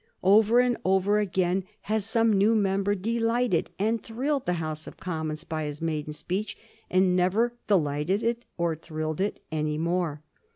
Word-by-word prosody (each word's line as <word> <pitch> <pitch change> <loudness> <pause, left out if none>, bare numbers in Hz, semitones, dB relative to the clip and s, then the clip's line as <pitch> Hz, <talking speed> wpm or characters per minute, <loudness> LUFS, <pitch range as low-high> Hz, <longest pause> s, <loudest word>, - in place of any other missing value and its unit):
Over 215 +5 +5
and 245 -1 +3
over 190 +2 +3
again 190 -2 0 0.2
has 215 -1 -1
some 225 0 +2
new 205 +3 +4
member 200 -1 +1
delighted 230 0 0
and 220 +3 0
thrilled 265 +4 -2
the 180 - +2
House 155 -2 -4
of - - -10
Commons 155 -3 -4
by 155 -1 -3
his 150 0 -5
maiden 155 -2 -2
speech, 185 +8 -4 0.3
and 185 0 +3
never 200 +7 +2
delighted 160 +1 +1
it 235 +1 0
or 170 -2 0
thrilled 155 +1 -4
it 205 - -2
any 155 -1 -1
more. 165 -2 -1
190 Hz, 160 wpm, -27 LUFS, 160-220 Hz, 0.3 s, Over